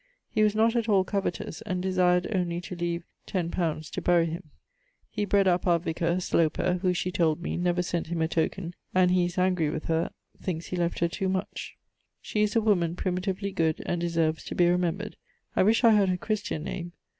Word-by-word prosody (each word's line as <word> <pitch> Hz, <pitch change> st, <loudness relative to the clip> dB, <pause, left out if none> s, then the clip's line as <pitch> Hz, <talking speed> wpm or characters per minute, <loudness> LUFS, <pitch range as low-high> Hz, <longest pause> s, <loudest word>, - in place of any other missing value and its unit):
He 215 Hz, -, +1 dB
was 210 Hz, -1 st, +3 dB
not 225 Hz, +2 st, +3 dB
at 230 Hz, -1 st, 0 dB
all 195 Hz, -3 st, +5 dB
covetous, 195 Hz, -4 st, -3 dB
and 185 Hz, 0 st, -3 dB
desired 180 Hz, -1 st, +2 dB
only 175 Hz, -3 st, 0 dB
to 180 Hz, -, -7 dB
leave 170 Hz, 0 st, -2 dB, 0.3 s
x 175 Hz, -3 st, -1 dB
li. 160 Hz, -3 st, 0 dB
to -, -, -4 dB
bury 175 Hz, -1 st, +4 dB
him. 165 Hz, 0 st, -6 dB, 0.6 s
He 210 Hz, -1 st, -1 dB
bred 200 Hz, -1 st, +3 dB
up 180 Hz, 0 st, +2 dB
our 170 Hz, -1 st, +5 dB
vicar, 170 Hz, +1 st, -1 dB
[Sloper], 180 Hz, +1 st, +1 dB
who, 185 Hz, -2 st, +2 dB
she 180 Hz, +1 st, -1 dB
told 165 Hz, -3 st, +1 dB
me, 175 Hz, -, -3 dB
never 175 Hz, 0 st, +1 dB
sent 175 Hz, -2 st, -2 dB
him 170 Hz, 0 st, -3 dB
a -, -, +2 dB
token; 170 Hz, +2 st, -1 dB, 0.2 s
and 185 Hz, -1 st, +5 dB
he 180 Hz, -1 st, +3 dB
is 175 Hz, +1 st, -5 dB
angry 180 Hz, -4 st, +2 dB
with 155 Hz, +1 st, -4 dB
her, 165 Hz, 0 st, 0 dB, 0.3 s
thinks 170 Hz, -3 st, -3 dB
he -, -, -4 dB
left 175 Hz, -1 st, 0 dB
her 170 Hz, -, +4 dB
too 190 Hz, +3 st, -2 dB
much. 190 Hz, +1 st, -4 dB, 0.4 s
She 210 Hz, -, -2 dB
is 210 Hz, +1 st, +1 dB
a 230 Hz, -, +4 dB
woman 175 Hz, -6 st, +2 dB
primitively 190 Hz, +2 st, -2 dB
good, 160 Hz, -4 st, 0 dB
and 175 Hz, -, -1 dB
deserves 165 Hz, -2 st, 0 dB
to -, -, -5 dB
be 175 Hz, -, +4 dB
remembred. 180 Hz, +4 st, 0 dB, 0.4 s
I -, -, +4 dB
wish 220 Hz, +6 st, +4 dB
I 230 Hz, -, +8 dB
had 205 Hz, -3 st, +4 dB
her 180 Hz, -, +1 dB
Christian 205 Hz, -5 st, -2 dB
name. 175 Hz, 0 st, -5 dB
180 Hz, 215 wpm, -27 LUFS, 170-190 Hz, 0.6 s, I